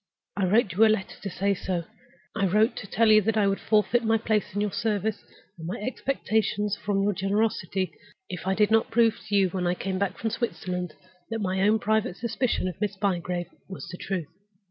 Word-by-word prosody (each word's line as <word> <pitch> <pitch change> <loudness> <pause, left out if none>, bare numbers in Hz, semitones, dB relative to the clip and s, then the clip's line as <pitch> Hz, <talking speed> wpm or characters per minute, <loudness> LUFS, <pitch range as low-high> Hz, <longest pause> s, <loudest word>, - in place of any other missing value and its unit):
I 200 - +1
wrote 205 +2 +3
you 205 +5 +4
a - - +8
letter 215 -3 0
to 200 - -4
say 200 +2 0
so—I 190 +2 -4
wrote 215 +5 +3
to 200 - -6
tell 220 +3 +3
you 215 0 +7
that 220 +2 0
I 210 - +4
would 195 0 +1
forfeit 220 +2 +2
my 225 0 +3
place 215 -2 -1
in - - 0
your 210 -1 0
service, 215 0 -1 0.4
and 160 - -6
my 180 - -3
expectations 215 -4 -1
from 200 -1 -1
your 205 +1 +2
generosity, 195 -3 0 0.3
if 180 0 -6
I 190 - +2
did 210 +1 +3
not 225 0 +3
prove 230 -1 +3
to 205 - 0
you 195 -2 +4
when 180 -1 -2
I 175 - +1
came 190 0 -3
back 200 -2 -1
from 225 - -2
Switzerland 180 -6 -3 0.3
that 225 - -2
my 190 -2 -1
own 210 +3 +4
private 215 -3 0
suspicion 235 -3 -1
of 185 +2 -6
Miss 205 -2 -1
Bygrave 180 -3 -1 0.2
was 190 - -7
the 180 - -7
truth. 185 -4 -3
200 Hz, 210 wpm, -26 LUFS, 185-220 Hz, 0.4 s, a